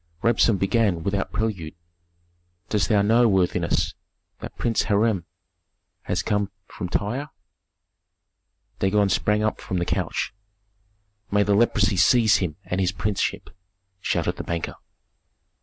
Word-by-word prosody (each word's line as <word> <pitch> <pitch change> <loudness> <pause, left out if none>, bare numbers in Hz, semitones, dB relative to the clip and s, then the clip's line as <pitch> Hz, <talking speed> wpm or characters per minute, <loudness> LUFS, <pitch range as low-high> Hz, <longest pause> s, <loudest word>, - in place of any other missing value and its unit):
Rabsun 115 -2 +3
began 95 -3 +1
without 100 0 -1
prelude, 95 -9 -3 0.9
"Dost 105 -2 +1
thou 105 -3 +4
know, 115 +3 +4
worthiness, 95 -4 +1 0.5
that - - -9
Prince 115 -2 +1
Hiram 105 -4 +1 0.8
has 90 - -1
come 105 -2 0 0.2
from 90 +1 -6
Tyre?" 120 +11 -2 1.5
Dagon 100 +1 +2
sprang 105 +3 +1
up 110 - -1
from 95 - -3
the 85 - 0
couch. - - -2 1.0
"May 105 0 +3
the 100 - +2
leprosy 105 -2 +3
seize 110 +3 +5
him 85 -6 -2
and 90 +1 -1
his 90 -1 +1
princeship!" 100 +1 -2 0.5
shouted - - -1
the - - -4
banker. 85 -1 -3
100 Hz, 125 wpm, -24 LUFS, 95-110 Hz, 1.5 s, seize